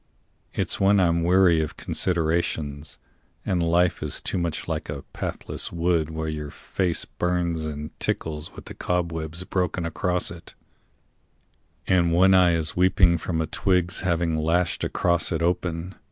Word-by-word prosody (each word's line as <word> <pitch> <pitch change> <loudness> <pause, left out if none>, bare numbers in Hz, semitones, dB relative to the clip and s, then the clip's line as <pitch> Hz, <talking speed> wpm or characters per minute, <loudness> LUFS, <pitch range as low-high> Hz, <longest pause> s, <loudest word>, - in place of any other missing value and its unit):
It's - - -1
when 100 +1 +4
I'm 85 -2 +2
weary 90 -2 +5
of 80 - -4
considerations, 80 -4 0 0.5
And 90 -2 +1
life 85 +1 +2
is 75 -2 -1
too - - -2
much 85 -2 -2
like 80 -2 -3
a 70 -2 -5
pathless - - -3
wood 85 -2 +1
Where 80 0 -4
your 75 -1 -4
face 90 +3 -2
burns 85 -2 -1
and 75 0 -5
tickles 75 -1 -2
with - - -10
the - - -8
cobwebs 85 -1 -2
Broken 90 -2 -1
across 90 +2 -1
it, 85 0 -11 1.3
and 85 -3 +3
one 95 +3 +5
eye 90 -2 +5
is 80 -2 -1
weeping 90 -2 +4
From 80 -1 -2
a - - 0
twig's 90 +1 0
having 85 -3 0
lashed 85 +2 +1
across 85 -1 +1
it 85 -1 -1
open. 90 0 -1
85 Hz, 150 wpm, -25 LUFS, 80-90 Hz, 1.3 s, weary